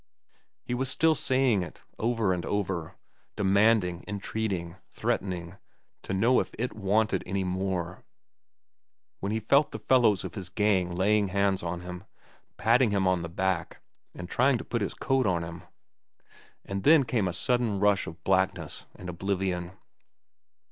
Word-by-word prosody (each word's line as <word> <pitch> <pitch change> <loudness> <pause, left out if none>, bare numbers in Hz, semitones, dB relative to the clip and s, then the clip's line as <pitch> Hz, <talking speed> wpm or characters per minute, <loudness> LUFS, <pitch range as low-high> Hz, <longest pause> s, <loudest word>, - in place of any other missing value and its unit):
He - - -4
was 130 +1 0
still 160 +4 +3
saying 130 -7 +2
it, 85 -4 -8 0.2
over 115 -4 +1
and 90 -1 -3
over,—demanding, 95 +1 0
entreating, 100 -4 -3
threatening, 90 -1 -3 0.4
to - - -7
know 115 +7 +3
if - - -4
it 125 +3 -2
wanted 105 +2 +1
any 95 +1 -1
more,—when 95 +1 -7
he 110 - 0
felt 140 +7 +3
the - - -5
fellows 115 -7 +3
of - - -6
his 95 -4 -7
gang 95 -3 +1
laying 100 +2 +2
hands 100 0 +1
on 85 0 -4
him, 90 +1 -8 0.5
patting 115 +3 +4
him 100 -2 +1
on 90 -1 +2
the 85 - -5
back 95 0 -2 0.4
and 90 - -7
trying 130 +6 +3
to - - -8
put 120 - -2
his 100 - -2
coat 135 -3 +1
on 85 -3 +1
him. 85 +1 -7 1.0
And 100 0 -3
then 150 +6 +6
came 115 -5 0
a - - -1
sudden 110 +4 0
rush 105 0 +2
of 80 +2 -9
blackness 95 -4 0
and 90 - -9
oblivion. 90 0 -2
95 Hz, 150 wpm, -28 LUFS, 90-110 Hz, 1.0 s, then